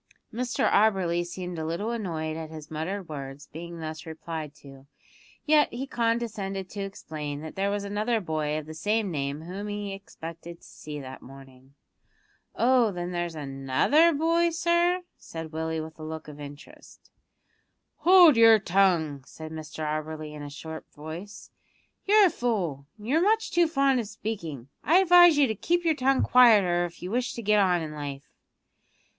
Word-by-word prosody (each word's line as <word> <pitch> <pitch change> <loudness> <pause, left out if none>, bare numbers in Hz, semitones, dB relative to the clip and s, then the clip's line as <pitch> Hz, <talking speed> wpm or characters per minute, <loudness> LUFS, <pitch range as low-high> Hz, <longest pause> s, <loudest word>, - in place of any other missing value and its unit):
Mr 245 +2 0
Auberly 190 -5 +2
seemed 180 -1 -6
a - - -3
little 170 +8 -2
annoyed 165 -9 -3
at 160 -1 -6
his 155 -1 -10
muttered 180 +5 -4
words 140 -2 -7
being 170 +1 -8
thus 160 +1 -7
replied 160 -1 -6
to, 135 -1 -15 0.6
yet 300 -1 +4
he 250 +3 -4
condescended 230 -6 -2
to 205 - -7
explain 155 -7 -6
that 160 0 -8
there 195 +1 0
was 205 0 -2
another 210 +3 0
boy 155 -4 -2
of 155 - -5
the 155 - -8
same 205 +5 -1
name 140 -1 -3
whom 190 +5 -6
he 205 -1 -4
expected 170 -3 -9
to - - -27
see 150 -1 -8
that 130 -1 -9
morning. 135 0 -15 0.8
"Oh, 245 -2 +4
then 175 -1 -4
there's 175 -2 -3
another 135 - +2
other 330 -4 +2
boy, 335 +2 +2
sir?" 345 +2 +1 0.2
said 160 -1 -8
Willie 160 0 -2
with 160 0 -8
a - - -8
look 160 0 -7
of 150 -1 -10
interest. 145 0 -13 0.9
"Hold 345 -1 +7
your 225 -1 +8
tongue!" 175 -8 +1
said 155 0 -9
Mr 155 0 -6
Auberly 155 0 -4
in 150 - -8
a 145 - -7
sharp 160 +2 -9
voice; 165 +7 -9 0.5
"you're 415 +1 +6
a 360 - +3
fool, 180 - -2
and 210 - -12
you're 305 +6 +3
much 435 +3 +2
too 345 -1 +4
fond 275 -4 +2
of 225 - -3
speaking. 195 - -6 0.2
I 330 +5 +4
advise 350 -3 +7
you 290 - +5
to 220 - -1
keep 345 - -1
your 325 - +4
tongue 270 -1 +2
quieter 205 -8 +5
if 175 0 -10
you 180 - -5
wish 245 +1 -1
to 235 - -6
get 210 0 +3
on 180 -4 +2
in 155 - -6
life." 140 -2 -7
175 Hz, 175 wpm, -27 LUFS, 155-235 Hz, 0.9 s, your